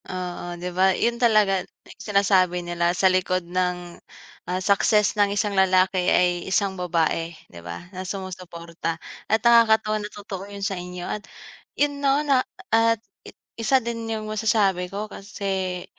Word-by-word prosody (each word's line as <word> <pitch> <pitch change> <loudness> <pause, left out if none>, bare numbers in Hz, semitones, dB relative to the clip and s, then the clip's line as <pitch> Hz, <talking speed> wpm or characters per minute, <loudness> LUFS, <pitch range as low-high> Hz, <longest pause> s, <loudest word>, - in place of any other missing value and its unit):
Oo, 175 -1 -5
'di 180 +1 -5
ba 190 +1 +3
iyun 235 +1 0
talaga 210 -5 +4
eh, - - -16
sinasabi 190 -4 +2
nila 175 0 0
sa - - +1
likod 185 -1 +2
ng, 180 0 -3 0.5
ah, 180 - 0
success 200 +2 +3
ng 205 -2 +2
isang 205 0 -1
lalaki 185 -1 +3
ay 175 -1 +3
isang 195 0 +1
babae, 170 -2 -1 0.2
'di 85 - -10
ba 85 - -8
na 185 - -5
sumusuporta, 180 -3 -5 0.3
at 220 - +3
nakakatuwa 220 -2 +5
na 210 - -5
totoo 200 -2 -8
iyun 200 -1 -5
sa 200 - -1
inyo 180 -1 -6
at 210 - -4 0.6
iyun 285 -1 0
'no, 280 +2 +2
na 275 -3 +4 0.3
at 230 0 +4 0.6
1 230 +4 +3
din 230 -1 -4
'yung 220 -1 -3
masasabi 205 -4 +1
ko 200 +3 -4
kasi, 190 -3 -4
190 Hz, 155 wpm, -24 LUFS, 180-215 Hz, 0.6 s, nakakatuwa